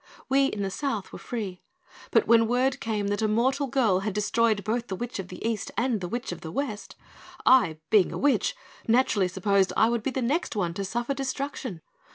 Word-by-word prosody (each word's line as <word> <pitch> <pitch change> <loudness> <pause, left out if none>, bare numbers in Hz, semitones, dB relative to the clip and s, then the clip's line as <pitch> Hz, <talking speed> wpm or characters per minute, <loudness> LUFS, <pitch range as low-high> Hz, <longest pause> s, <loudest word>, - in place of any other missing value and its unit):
We 275 +1 +4
in 205 -6 -3
the 195 - -2
South 225 -4 -3
were - - -7
free, 205 -7 -5 0.5
but - - +3
when 230 -1 +5
word 250 +3 +1
came 210 -3 -2
that 205 +2 -1
a 220 - +2
mortal 260 +6 +1
girl 230 -8 +2
had 200 +1 -3
destroyed 210 0 +1
both 235 +2 -1
the 190 - -3
Witch 240 +2 -5
of 190 - -5
the 185 +5 -5
East 225 -3 -2
and 235 -4 +1
the 180 - -3
Witch 240 +5 -4
of 175 - -7
the 160 - -7
West, 215 - -4 0.5
I, 240 -12 +5
being 205 -4 +5
a - - -4
witch, 290 - +2 0.3
naturally 225 -5 +3
supposed 195 +1 +1
I 220 - +5
would 235 -1 0
be 250 - -1
the 260 -1 -2
next 285 +3 -1
one 175 -5 -1
to 195 - -3
suffer 240 +7 -2
destruction. 270 - -4
225 Hz, 210 wpm, -27 LUFS, 200-255 Hz, 0.5 s, when